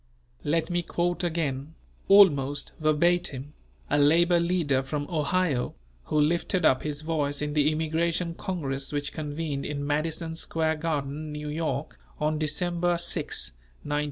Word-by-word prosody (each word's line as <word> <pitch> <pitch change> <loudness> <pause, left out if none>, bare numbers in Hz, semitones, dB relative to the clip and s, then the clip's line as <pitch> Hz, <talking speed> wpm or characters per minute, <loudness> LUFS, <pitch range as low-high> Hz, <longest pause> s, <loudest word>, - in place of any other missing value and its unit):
Let 165 +3 0
me 175 0 +1
quote 175 +1 -1
again, 155 -3 -2 0.3
almost 145 -9 +5
verbatim, 155 -2 +1 0.3
a 145 - +2
labour 170 +4 +5
leader 170 -6 +1
from 145 +2 -3
Ohio, 155 -4 0 0.3
who 150 - +1
lifted 170 +3 +1
up 130 - +4
his 150 -1 -3
voice 150 -3 -1
in 150 0 -2
the 150 0 +3
Immigration 165 +2 0
Congress 140 -7 -3
which 145 -1 -2
convened 150 -2 -3
in 145 -1 -3
Madison 160 +2 -1
Square 160 -1 0
Garden, 150 -1 -3
New 150 0 -5
York, 155 - -3 0.2
on 150 0 0
December 175 +3 0
6, 170 - 0 0.3
1905. 145 0 -1
155 Hz, 135 wpm, -27 LUFS, 145-170 Hz, 0.3 s, almost